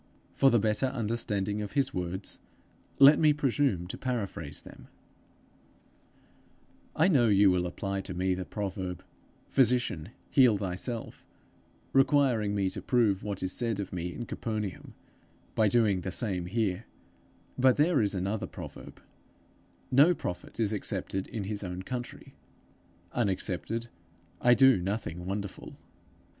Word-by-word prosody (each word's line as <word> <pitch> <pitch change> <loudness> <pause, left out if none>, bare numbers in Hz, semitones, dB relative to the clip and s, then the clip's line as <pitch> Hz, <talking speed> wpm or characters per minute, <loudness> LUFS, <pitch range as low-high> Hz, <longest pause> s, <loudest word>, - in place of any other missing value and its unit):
For 135 - +5
the 120 - +4
better 110 +4 +1
understanding 105 -4 -2
of 105 - -6
his 140 -1 +1
words, 90 +2 -4 0.6
let 140 +2 +8
me 155 -2 +5
presume 135 -9 0
to 90 - -7
paraphrase 120 -7 -4
them: - - -13 2.1
'I 160 - +4
know 130 -9 +4
you 100 -2 +5
will 90 -1 +1
apply 95 +2 -3
to 90 - -7
me 95 +1 +1
the 90 0 -3
proverb, 95 -3 -5 0.4
Physician, 120 - +1 0.2
heal 125 -6 +5
thyself, 100 +5 -5 0.7
requiring 135 -7 +3
me 100 -1 +1
to - - -5
prove 110 -6 +2
what 100 -2 -3
is 95 - -1
said 115 -4 -1
of 95 -2 -5
me 90 0 -3
in 120 - -6
Capernaum, 105 -6 -5 0.6
by 110 - +3
doing 105 -4 +3
the 95 - -4
same 90 -3 -2
here; 105 0 -1 0.7
but 130 0 +4
there 150 -1 +3
is 100 -1 0
another 100 +3 -2
proverb, - - -10 0.9
No 145 +7 +6
prophet 90 - -6
is 110 -2 +1
accepted 95 -1 -3
in 110 -4 -5
his 105 +1 -4
own 90 0 -5
country. 125 +3 -7 0.8
Unaccepted 110 +1 -2 0.5
I 120 0 +6
do 135 -3 +6
nothing 90 -3 -4
wonderful. 100 0 -5
105 Hz, 135 wpm, -29 LUFS, 95-125 Hz, 2.1 s, let